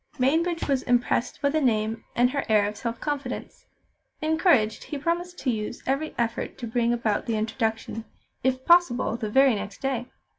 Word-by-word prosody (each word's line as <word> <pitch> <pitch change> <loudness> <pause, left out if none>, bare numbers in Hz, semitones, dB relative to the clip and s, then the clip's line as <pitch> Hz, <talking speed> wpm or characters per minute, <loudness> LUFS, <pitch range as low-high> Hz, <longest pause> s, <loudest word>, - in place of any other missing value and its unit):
Mainbridge 330 +6 +1
was 275 -3 +2
impressed 245 0 +1
by 285 - +4
the 310 +1 +1
name 225 -3 +1
and 245 +1 +3
her 280 0 -1
air 210 -2 +4
of 210 - -5
self 230 +2 -4
confidence. 285 -4 -4 0.5
Encouraged, 310 - +2
he 295 - -5
promised 345 +4 -2
to 255 - 0
use 215 +1 -4
every 275 +4 -1
effort 235 -1 -2
to 245 - -5
bring 235 +1 +1
about 230 -3 0
the 230 - 0
introduction, 225 0 -2 0.4
if 260 0 0
possible 340 -10 +4
the 220 -2 -3
very 265 +3 +5
next 205 -1 -5
day. 255 -3 -2
245 Hz, 175 wpm, -26 LUFS, 225-285 Hz, 0.5 s, very